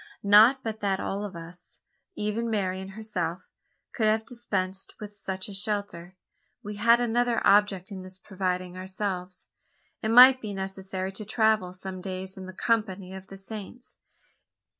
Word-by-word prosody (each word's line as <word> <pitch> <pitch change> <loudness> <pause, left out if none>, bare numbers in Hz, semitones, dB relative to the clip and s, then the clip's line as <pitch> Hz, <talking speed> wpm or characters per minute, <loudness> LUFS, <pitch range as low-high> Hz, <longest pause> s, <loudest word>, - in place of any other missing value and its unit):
Not 220 +6 +7
but 220 -1 -4
that 195 -2 0
all 200 +1 -3
of 200 -3 -6
us 170 +2 -11 0.4
even 210 +3 -2
Marian 190 -3 -1
herself 180 -6 -3 0.5
could 220 -3 +1
have 220 +1 +2
dispensed 195 -6 -4
with 210 -1 -8
such 190 -2 -4
a 205 - -8
shelter. 195 -3 -3 0.5
We 210 0 -6
had 235 +3 +5
another 240 0 +1
object 200 -2 +3
in 190 -2 -6
thus 185 0 -11
providing 185 -2 -3
ourselves. 185 -1 -4 0.6
It 220 - -1
might 255 +3 +9
be 205 -2 -5
necessary 190 0 -4
to 210 +2 -7
travel 220 -3 +2
some 185 0 -7
days 190 0 -5
in 185 -1 -8
the - - -7
company 195 -3 -1
of 190 0 -9
the 195 - -10
Saints. 215 +5 -9
195 Hz, 155 wpm, -27 LUFS, 185-220 Hz, 0.6 s, might